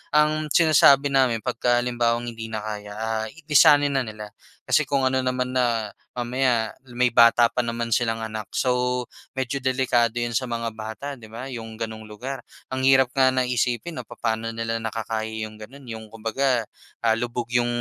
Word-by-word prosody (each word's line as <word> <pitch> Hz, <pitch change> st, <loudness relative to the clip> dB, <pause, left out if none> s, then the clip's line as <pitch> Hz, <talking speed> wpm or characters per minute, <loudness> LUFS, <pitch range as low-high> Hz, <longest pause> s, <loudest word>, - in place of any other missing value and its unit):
ang 155 Hz, 0 st, +3 dB
sinasabi 145 Hz, -3 st, +6 dB
namin 125 Hz, -5 st, +2 dB
pagka 120 Hz, +1 st, +1 dB
halimbawang 120 Hz, -1 st, 0 dB
hindi 115 Hz, 0 st, -7 dB
na 110 Hz, -1 st, -5 dB
kaya, 105 Hz, -1 st, -6 dB
ah, 110 Hz, 0 st, -2 dB, 0.2 s
lisanin 145 Hz, 0 st, +6 dB
na 135 Hz, -, +2 dB
nila. 105 Hz, -1 st, -8 dB, 0.4 s
Kasi -, -, +3 dB
kung 140 Hz, -2 st, +1 dB
ano 130 Hz, 0 st, +2 dB
naman 125 Hz, 0 st, -1 dB
na 120 Hz, -4 st, 0 dB, 0.2 s
mamaya 120 Hz, -2 st, 0 dB, 0.2 s
may 125 Hz, -1 st, +3 dB
bata 115 Hz, 0 st, +6 dB
pa -, -, -3 dB
naman 115 Hz, -1 st, -2 dB
silang 115 Hz, -1 st, +1 dB
anak. 110 Hz, -2 st, -5 dB
So, 125 Hz, -1 st, +1 dB, 0.3 s
medyo 130 Hz, +1 st, -2 dB
delikado 125 Hz, -3 st, +1 dB
'yon 120 Hz, 0 st, -1 dB
sa 130 Hz, +2 st, -1 dB
mga 115 Hz, -1 st, -3 dB
bata, 110 Hz, +5 st, -7 dB
'di 110 Hz, -, -12 dB
ba, 120 Hz, +5 st, -8 dB
yung 115 Hz, -2 st, -7 dB
gano'ng 110 Hz, -1 st, -6 dB
lugar. 130 Hz, +6 st, -6 dB, 0.3 s
Ang 130 Hz, 0 st, 0 dB
hirap 130 Hz, -1 st, +5 dB
nga 130 Hz, -1 st, +4 dB
na 130 Hz, -, +2 dB
isipin 125 Hz, +5 st, -1 dB
'no, -, -, -5 dB
papaano 115 Hz, 0 st, -2 dB
nila 115 Hz, 0 st, -2 dB
nakakaya 110 Hz, 0 st, -3 dB, 0.2 s
yung 110 Hz, -, -13 dB
gano'n, 135 Hz, +6 st, -12 dB
yung 110 Hz, -1 st, -7 dB
kumbaga, 115 Hz, +3 st, 0 dB, 0.4 s
ah, 115 Hz, -1 st, +4 dB
lubog 120 Hz, -1 st, -3 dB
yung 120 Hz, 0 st, +2 dB
120 Hz, 175 wpm, -24 LUFS, 115-130 Hz, 0.4 s, sinasabi